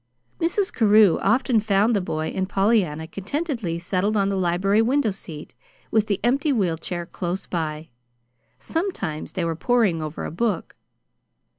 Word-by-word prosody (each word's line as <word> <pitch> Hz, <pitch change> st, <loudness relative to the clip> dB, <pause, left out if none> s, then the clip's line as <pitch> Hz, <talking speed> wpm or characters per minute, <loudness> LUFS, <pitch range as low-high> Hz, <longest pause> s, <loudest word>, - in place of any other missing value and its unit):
Mrs. 365 Hz, +4 st, 0 dB
Carew 210 Hz, -5 st, +5 dB
often 250 Hz, -3 st, +3 dB
found 210 Hz, +2 st, +2 dB
the 200 Hz, -, +1 dB
boy 155 Hz, -3 st, -3 dB
and 190 Hz, 0 st, -2 dB
Pollyanna 195 Hz, -7 st, +1 dB
contentedly 210 Hz, -, -3 dB
settled 185 Hz, +5 st, 0 dB
on 200 Hz, -1 st, +2 dB
the 200 Hz, -, -1 dB
library 190 Hz, +3 st, +2 dB
window 250 Hz, 0 st, +2 dB
seat, 165 Hz, -5 st, -9 dB, 0.4 s
with 220 Hz, -1 st, +2 dB
the 200 Hz, -, 0 dB
empty 275 Hz, +6 st, +2 dB
wheel 185 Hz, -, 0 dB
chair 175 Hz, +1 st, -4 dB
close 180 Hz, +1 st, -4 dB
by. 160 Hz, -2 st, -4 dB, 0.7 s
Sometimes 320 Hz, -, -3 dB
they 180 Hz, -, -1 dB
were 165 Hz, -1 st, -1 dB
poring 210 Hz, -4 st, +2 dB
over 155 Hz, 0 st, -5 dB
a -, -, -5 dB
book. 205 Hz, +1 st, -2 dB
195 Hz, 150 wpm, -23 LUFS, 170-230 Hz, 0.7 s, Carew